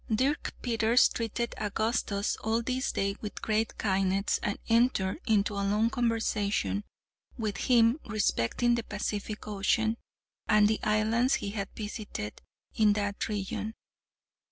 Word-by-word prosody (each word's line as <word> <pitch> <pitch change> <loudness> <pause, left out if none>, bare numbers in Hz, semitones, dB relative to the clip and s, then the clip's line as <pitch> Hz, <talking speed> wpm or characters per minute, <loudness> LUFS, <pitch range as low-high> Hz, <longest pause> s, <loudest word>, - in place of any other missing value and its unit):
Dirk 265 +7 0
Peters 230 0 +4
treated 235 +1 -3
Augustus 210 -1 0
all 225 +2 0
this 255 +2 -1
day 200 0 -1
with 210 - -6
great 220 +1 0
kindness 195 0 +1
and 205 - -1
entered 230 -2 +2
into 210 -2 +2
a 200 - -2
long 210 +3 +2
conversation 210 - 0 0.5
with 215 -3 -2
him 240 +2 +4
respecting 215 - +1
the 235 - +1
Pacific 210 0 -4
Ocean, 220 +2 +1 0.5
and 210 -1 +6
the 215 0 +1
islands 220 +4 +2
he 200 - -3
had 200 -2 -4
visited 205 - -6 0.3
in 215 -2 +4
that 205 +1 -2
region. 210 +1 -3
215 Hz, 130 wpm, -29 LUFS, 205-230 Hz, 0.5 s, and